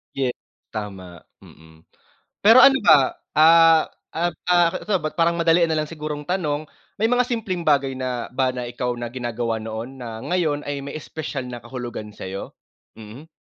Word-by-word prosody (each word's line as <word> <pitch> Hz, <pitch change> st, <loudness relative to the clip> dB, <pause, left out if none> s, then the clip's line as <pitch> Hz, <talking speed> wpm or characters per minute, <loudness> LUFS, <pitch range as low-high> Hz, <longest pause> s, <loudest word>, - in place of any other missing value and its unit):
Ye 130 Hz, -2 st, 0 dB, 0.4 s
tama, 95 Hz, -5 st, -7 dB, 0.2 s
mm. 80 Hz, 0 st, -18 dB, 0.6 s
Pero 230 Hz, +5 st, +7 dB
ano 270 Hz, -1 st, +7 dB
ba, 140 Hz, -4 st, +5 dB, 0.2 s
ah, 165 Hz, +1 st, +6 dB, 0.2 s
ah, 175 Hz, +2 st, 0 dB, 0.2 s
ah, 175 Hz, -1 st, +4 dB, 0.2 s
so, 195 Hz, -6 st, 0 dB
ba't 155 Hz, +2 st, -5 dB
parang 170 Hz, 0 st, +3 dB
madalian 170 Hz, 0 st, +3 dB
nal 155 Hz, -1 st, 0 dB
ang 150 Hz, -, -8 dB
sigurong 150 Hz, -2 st, -5 dB
tanong, 155 Hz, -3 st, -2 dB, 0.3 s
may 225 Hz, -, +3 dB
mga 250 Hz, 0 st, +2 dB
simpleng 195 Hz, -9 st, -3 dB
bagay 135 Hz, -3 st, +2 dB
na 125 Hz, -2 st, -4 dB
ba 130 Hz, 0 st, 0 dB
na 125 Hz, -, -4 dB
ikaw 125 Hz, 0 st, -2 dB
na 120 Hz, -1 st, -6 dB
ginagawa 120 Hz, -2 st, -3 dB
noon 110 Hz, +4 st, -7 dB
na 115 Hz, -2 st, -7 dB
ngayon 160 Hz, -5 st, -1 dB
ay 145 Hz, -1 st, -4 dB
may 140 Hz, -, -7 dB
espesyal 155 Hz, -3 st, -5 dB
na 120 Hz, -, -6 dB
kahulugan 120 Hz, -3 st, -7 dB
sa'yo? 95 Hz, +1 st, -7 dB, 0.4 s
Mhm. 115 Hz, +8 st, -12 dB
145 Hz, 165 wpm, -22 LUFS, 120-165 Hz, 0.6 s, Pero